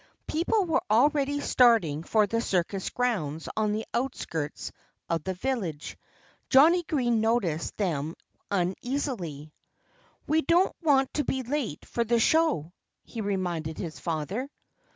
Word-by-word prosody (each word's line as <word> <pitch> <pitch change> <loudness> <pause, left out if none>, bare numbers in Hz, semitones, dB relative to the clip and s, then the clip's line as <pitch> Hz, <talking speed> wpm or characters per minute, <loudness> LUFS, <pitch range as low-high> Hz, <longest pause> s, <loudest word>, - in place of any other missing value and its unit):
People 365 +6 +1
were 330 -1 +1
already 285 +5 +3
starting 225 - +4
for 215 +5 +2
the 230 +3 -1
circus 190 -2 -1
grounds 170 -12 -2
on 215 -1 +1
the 215 +1 -2
outskirts 165 - -3 0.4
of 165 -2 -1
the 190 +2 -3
village. 185 - -3 0.5
Johnnie 320 +7 +6
Green 245 -9 0
noticed 220 -9 0
them 160 -6 -1 0.3
uneasily. 185 - -2 0.7
"We 315 +1 +2
don't 340 +5 +3
want 275 -5 +3
to 295 - 0
be 265 -2 -2
late 250 - -3
for 235 - -1
the 235 +1 +2
show," 220 - +2 0.3
he 230 - -6
reminded 175 -6 -2
his 155 -6 -6
father. 170 - -3
220 Hz, 130 wpm, -27 LUFS, 170-270 Hz, 0.7 s, Johnnie